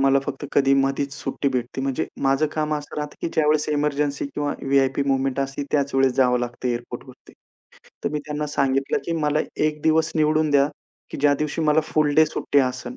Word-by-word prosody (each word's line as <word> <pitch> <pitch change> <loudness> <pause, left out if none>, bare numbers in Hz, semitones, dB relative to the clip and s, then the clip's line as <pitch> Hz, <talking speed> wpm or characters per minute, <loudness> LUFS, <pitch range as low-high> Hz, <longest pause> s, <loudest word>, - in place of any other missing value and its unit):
मला 135 0 +4
फक्त - - -5
कधी 135 -1 +4
मधीच 135 0 0
सुट्टी 140 0 -2
भेटते 125 0 -3
म्हणजे 135 -1 -1 0.2
माझं 135 +3 +2
काम 155 -1 -1
असं 145 -1 -6
राहतं, 150 -1 -4
की - - -2
ज्यावेळेस 150 -1 +2
एमर्जन्सी 145 -1 0
किंवा 145 +1 -3
व्ही-आय-पी 135 0 +2
मूव्हमेंट 135 0 0
असते 135 +1 -3
त्याच 140 -2 +1
वेळेस 135 -1 +3
जावं 125 -2 +3
लागतं 120 +1 -3
एअरपोर्टवरती. 120 +1 -7 0.7
तर - - +2
मी 150 - -1
त्यांना 150 0 -3
सांगितलं, 135 -2 0
की 170 - -1
मला 150 +1 +2 0.3
एक 150 -1 -3
दिवस 160 0 +2
निवडून 155 0 +2
द्या 140 0 +4 0.4
की - - -6
ज्या 145 0 +4
दिवशी 150 +2 -3
मला 155 +1 +4
फुल 155 -2 +1
डे 155 +1 +6
सुट्टी 145 -1 0
असेल. 130 - -1
140 Hz, 190 wpm, -23 LUFS, 135-150 Hz, 0.7 s, डे